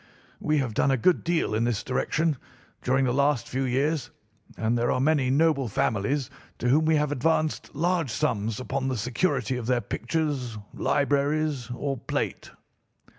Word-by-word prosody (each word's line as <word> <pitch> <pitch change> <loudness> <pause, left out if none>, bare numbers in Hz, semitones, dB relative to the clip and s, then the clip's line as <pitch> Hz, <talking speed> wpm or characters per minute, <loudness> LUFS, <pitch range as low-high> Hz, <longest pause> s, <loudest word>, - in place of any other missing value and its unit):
We 155 0 +1
have 130 -6 -1
done 140 - +2
a 135 - +3
good 175 +9 +3
deal 170 -9 0
in 110 +2 +1
this 120 -3 0
direction 155 +3 0 0.4
during 130 +1 +2
the 125 - +1
last 140 -1 +2
few 130 +1 -1
years, 135 +1 0 0.5
and 115 +1 +1
there 120 0 +1
are - - +1
many 140 -2 +2
noble 140 -1 +3
families 115 +6 0 0.3
to 125 - -1
whom 155 +5 +4
we 160 0 +4
have 150 -1 +1
advanced 155 +3 0
large 170 -1 +1
sums 105 -1 -1
upon 130 +1 -2
the 130 -2 -1
security 125 - 0
of 120 -2 -5
their 125 -1 +3
pictures, 140 -9 -2 0.2
libraries, 145 -1 0
or 135 +2 -3
plate. - - -3
135 Hz, 165 wpm, -26 LUFS, 125-150 Hz, 0.5 s, whom